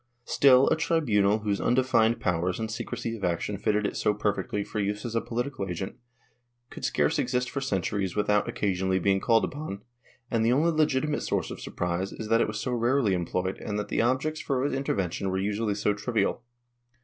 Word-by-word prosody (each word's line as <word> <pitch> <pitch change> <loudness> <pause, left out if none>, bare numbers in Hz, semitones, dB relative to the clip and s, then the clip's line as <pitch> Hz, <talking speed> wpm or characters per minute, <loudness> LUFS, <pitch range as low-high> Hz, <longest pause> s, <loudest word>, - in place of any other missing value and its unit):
Still, 135 -1 +5
a - - +3
tribunal, 110 -11 +2
whose 100 -2 0
undefined 120 -2 +3
powers 90 +1 0
and 110 -1 -3
secrecy 115 0 -4
of 105 - -10
action 90 +3 -1
fitted 105 0 +1
it - - -2
so 105 - +1
perfectly 105 -1 -1
for 105 - -5
use 105 +2 -2
as 120 - -4
a 115 - +1
political 120 -3 -3
agent, 90 +2 -4 0.8
could - - -9
scarce - - +1
exist 125 0 0
for 140 - -3
centuries 95 -5 -1
without 105 0 +2
occasionally 95 -2 0
being 95 +1 +2
called 115 +2 +3
upon, 135 -9 -6 0.5
and 115 -1 +2
the 115 +2 +3
only 160 +6 +3
legitimate 150 -2 +1
source - - -1
of - - -7
surprise 90 +2 -2
is 110 - -7
that 115 +1 +4
it - - +2
was 110 -1 -4
so 125 - -2
rarely 120 -2 +2
employed 90 +1 -2
and 105 -1 -4
that 105 - -3
the - - +1
objects 130 +6 0
for 135 -2 0
its 145 - -1
intervention 100 -8 -1
were 95 - -1
usually 105 +2 -1
so 105 0 +1
trivial. 115 +3 -1
105 Hz, 195 wpm, -27 LUFS, 100-125 Hz, 0.8 s, Still